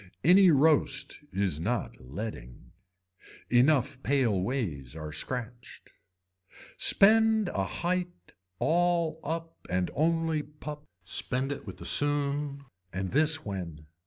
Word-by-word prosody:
Any 185 +5 +7
roast 145 -2 +2
is 95 -5 0
not 115 +9 -2
leading. 65 - -8 0.8
Enough 130 +1 +3
pale 125 -10 +1
ways 85 - -3
are 75 -1 -6
scratched. 120 +7 -7 0.8
Spend 220 0 +5
a 95 - -2
height 175 - -4 0.2
all 170 - +1
up 165 0 -6
and 90 0 -1
only 165 0 +1
pup, 150 0 -10 0.2
spend 130 +2 -3
it 140 - -6
with - - -8
the - - -10
soon. 145 -1 0 0.3
And 95 0 -3
this 155 - +3
when. 85 -7 -6
140 Hz, 110 wpm, -28 LUFS, 100-160 Hz, 0.8 s, Any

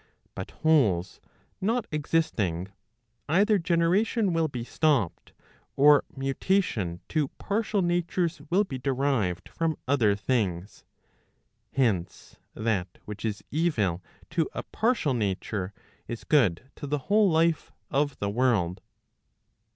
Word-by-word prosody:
But - - -6 0.2
wholes 105 - +3 0.4
not 225 +4 +1
existing, 110 - 0 0.6
either 200 +5 +4
generation 180 +5 +2
will 165 -1 +2
be 125 -5 -5
stopped, 130 - 0 0.4
or 145 +1 +6
mutation 135 - 0
to 155 -3 +1
partial 210 -1 0
natures 175 -2 0
will 190 +4 +4
be 135 -10 -6
derived 130 -9 0
from 165 -2 -1
other 120 -7 +3
things. 100 -4 -2 0.9
Hence 105 -10 -1 0.2
that 100 -5 -1
which 105 -1 -7
is 105 -2 -3
evil 115 - +1 0.3
to 165 -2 0
a - - -3
partial 220 - 0
nature 100 -3 -2 0.4
is 115 - -6
good 125 - +2
to 145 - -6
the 150 +1 0
whole 210 -1 +4
life 165 -1 +2 0.2
of 145 0 +1
the 100 0 -2
world. 105 -7 +1
140 Hz, 115 wpm, -27 LUFS, 105-170 Hz, 0.9 s, or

